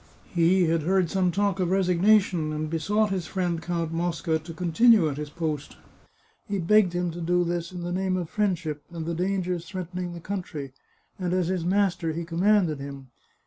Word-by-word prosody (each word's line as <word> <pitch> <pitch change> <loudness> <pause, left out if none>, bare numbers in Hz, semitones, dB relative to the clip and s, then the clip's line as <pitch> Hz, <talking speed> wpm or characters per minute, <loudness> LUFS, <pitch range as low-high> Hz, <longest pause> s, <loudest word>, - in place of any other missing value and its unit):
He 180 +2 +4
had 165 0 +1
heard 185 +1 +1
some 185 -2 +2
talk 200 +1 0
of 180 -2 +1
resignation, 185 -2 +3
and 155 0 -3
besought 205 +6 +1
his 185 -4 -2
friend 175 -3 -1
Count 170 -2 -2
Mosca 165 -1 -1
to 160 +2 -10
continue 180 +4 +4
at 145 -2 -3
his 150 0 -5
post. 155 -3 -4 0.7
He 205 -2 -1
begged 190 +1 +4
him 175 -1 -1
to 175 +1 -7
do 175 +1 +2
this 170 0 -2
in 180 -1 -6
the 175 - -3
name 185 0 0
of 175 -2 -3
friendship, 175 -7 -1
and 165 -2 -6
the 170 - -2
dangers 180 -1 -1
threatening 180 -1 -5
the 170 - -7
country, 165 -7 -5 0.5
and 180 -1 -1
as 180 -2 +1
his 185 -3 -1
master, 180 -3 +1
he 170 +1 -4
commanded 175 -2 +2
him. 140 -1 -8
175 Hz, 185 wpm, -26 LUFS, 165-185 Hz, 0.7 s, He